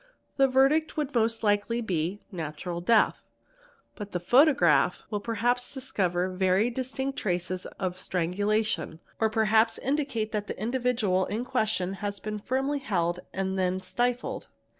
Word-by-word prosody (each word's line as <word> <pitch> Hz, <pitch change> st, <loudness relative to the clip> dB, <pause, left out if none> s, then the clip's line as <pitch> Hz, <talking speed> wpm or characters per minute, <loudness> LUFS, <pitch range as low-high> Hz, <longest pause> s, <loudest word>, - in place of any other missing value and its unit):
The 270 Hz, -1 st, +5 dB
verdict 275 Hz, +5 st, +3 dB
would 295 Hz, -2 st, -2 dB
most 225 Hz, -1 st, +1 dB
likely 205 Hz, +3 st, +1 dB
be 185 Hz, -2 st, -2 dB
"natural 170 Hz, 0 st, -5 dB
death'', 220 Hz, +5 st, +3 dB, 0.7 s
but 205 Hz, -2 st, -8 dB
the 180 Hz, -, 0 dB
photograph 180 Hz, -, +4 dB
will 210 Hz, -, -1 dB
perhaps 240 Hz, +4 st, -1 dB
discover 185 Hz, -9 st, 0 dB
very 190 Hz, +5 st, +2 dB
distinct 265 Hz, +2 st, -3 dB
traces 180 Hz, -1 st, -2 dB
of 185 Hz, -1 st, -3 dB
strangulation 185 Hz, -1 st, -1 dB, 0.2 s
or 220 Hz, -, +3 dB
perhaps 220 Hz, +1 st, +3 dB
indicate 270 Hz, -6 st, -1 dB
that 210 Hz, -1 st, -2 dB
the -, -, -6 dB
individual 225 Hz, -5 st, +1 dB
in 225 Hz, +4 st, -3 dB
question 215 Hz, -7 st, 0 dB
has 200 Hz, -1 st, -3 dB
been 210 Hz, +1 st, -4 dB
firmly 270 Hz, +6 st, -1 dB
held 180 Hz, -8 st, -1 dB
and 190 Hz, 0 st, -2 dB
then 185 Hz, 0 st, +1 dB
stifled. 245 Hz, +5 st, -2 dB
215 Hz, 140 wpm, -28 LUFS, 185-245 Hz, 0.7 s, The